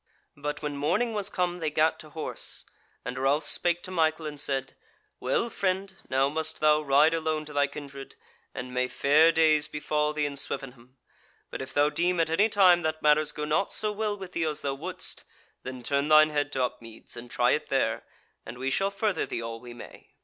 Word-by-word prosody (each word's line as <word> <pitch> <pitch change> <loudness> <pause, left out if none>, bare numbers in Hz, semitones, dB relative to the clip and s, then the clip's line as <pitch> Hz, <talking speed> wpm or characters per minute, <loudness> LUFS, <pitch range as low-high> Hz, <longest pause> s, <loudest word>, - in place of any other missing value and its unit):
But 150 +2 -5
when 150 -1 -3
morning 210 +11 +1
was 205 -2 0
come 180 -2 -1
they 160 -3 -1
gat 155 +1 +2
to 155 - -11
horse, 155 +1 -3 0.4
and 125 +1 -4
Ralph 140 +3 +2
spake 170 +3 +1
to 185 - -7
Michael 160 -2 +1
and 145 -2 -5
said: 135 -2 -2 0.4
"Well, 130 - 0
friend, 190 0 -1
now 135 +1 +3
must 160 +2 -3
thou 155 0 +4
ride 150 +2 +4
alone 155 -1 -1
to 150 - -10
thy 145 -1 +3
kindred, 140 -1 -9 0.4
and 125 0 -6
may 125 0 +1
fair 150 +6 +4
days 155 -2 +3
befall 150 0 -1
thee 150 -1 0
in 140 -1 -4
Swevenham. 130 -2 -7 0.5
But - - -5
if 130 - -8
thou 145 +1 +4
deem 175 +2 +1
at 160 -1 +1
any 205 +7 +3
time 185 -4 +5
that 155 -1 -2
matters 150 0 +4
go 150 - -4
not 155 +6 0
so 215 -1 -1
well 210 0 -2
with 190 -2 -8
thee 165 - -1
as 155 -2 -2
thou 140 - -1
wouldst, 170 +7 -7 0.4
then 130 -1 -7
turn 140 +3 0
thine 155 0 +6
head 145 -1 -1
to 130 - +1
Upmeads, 115 -3 -6
and 120 +1 -9
try 120 +1 +2
it 150 - -1
there, 135 -2 0 0.4
and 115 +2 -9
we 135 +1 -2
shall 195 +6 +1
further 200 -2 -1
thee 115 - -4
all 115 0 -5
we 120 0 -11
may." 120 - -12
150 Hz, 210 wpm, -27 LUFS, 135-165 Hz, 0.5 s, thine